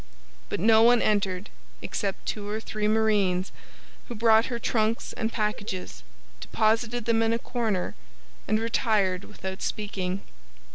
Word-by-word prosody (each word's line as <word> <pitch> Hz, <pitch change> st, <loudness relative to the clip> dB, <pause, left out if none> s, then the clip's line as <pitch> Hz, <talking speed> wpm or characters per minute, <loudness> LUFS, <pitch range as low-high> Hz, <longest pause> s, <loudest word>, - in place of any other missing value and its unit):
But -, -, -2 dB
no 220 Hz, +4 st, +6 dB
one 240 Hz, +1 st, +6 dB
entered 200 Hz, -2 st, 0 dB, 0.3 s
except 195 Hz, -3 st, -3 dB
two 205 Hz, -1 st, -4 dB
or 215 Hz, +1 st, -2 dB
three 215 Hz, -1 st, -2 dB
marines, 210 Hz, -4 st, +2 dB, 0.6 s
who 240 Hz, -, -6 dB
brought 225 Hz, +1 st, +4 dB
her 240 Hz, -, -3 dB
trunks 225 Hz, -1 st, 0 dB
and 225 Hz, +1 st, -2 dB
packages, 205 Hz, -, -3 dB, 0.4 s
deposited 220 Hz, -, 0 dB
them 230 Hz, -1 st, +2 dB
in 225 Hz, 0 st, +2 dB
a -, -, +2 dB
corner, 225 Hz, -6 st, -2 dB, 0.5 s
and 215 Hz, +1 st, +2 dB
retired 215 Hz, -5 st, +1 dB
without 190 Hz, +1 st, -7 dB
speaking. 195 Hz, -2 st, -3 dB
215 Hz, 135 wpm, -27 LUFS, 195-225 Hz, 0.6 s, no